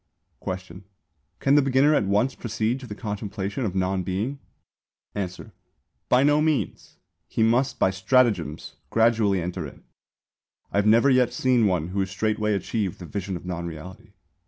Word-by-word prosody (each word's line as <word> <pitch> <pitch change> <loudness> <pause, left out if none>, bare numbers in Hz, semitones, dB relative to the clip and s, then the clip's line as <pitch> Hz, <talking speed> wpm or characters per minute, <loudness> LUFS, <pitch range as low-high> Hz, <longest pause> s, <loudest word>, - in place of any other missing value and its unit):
Question. 95 0 -6 0.5
Can 135 - +2
the 145 - +6
beginner 135 +2 +4
at 105 - +2
once 105 +7 +2
proceed 115 +1 -2
to 130 - -10
the 105 - -7
contemplation 105 +2 -4
of 95 -3 -3
non 95 0 0
Being? 100 +10 -3 0.7
Answer. 95 +1 -5 0.6
By 125 +2 +5
no 145 +1 +4
means! 155 -2 -1 0.3
He 110 - 0
must 120 +4 +2
by 95 - +3
stratagems 95 - +1
gradually 110 -4 +3
enter 90 -2 -4
in. - - -14 0.9
I - - -1
have 105 - +2
never 115 +6 +5
yet 125 -2 +4
seen 125 -3 +2
one 90 -3 0
who 95 +1 0
straightway 105 +2 0
achieved 100 -2 -2
the 90 - -9
vision 95 +1 -4
of 85 - -12
non 85 -1 -4
Reality. 90 +7 -10
105 Hz, 155 wpm, -25 LUFS, 95-125 Hz, 0.9 s, the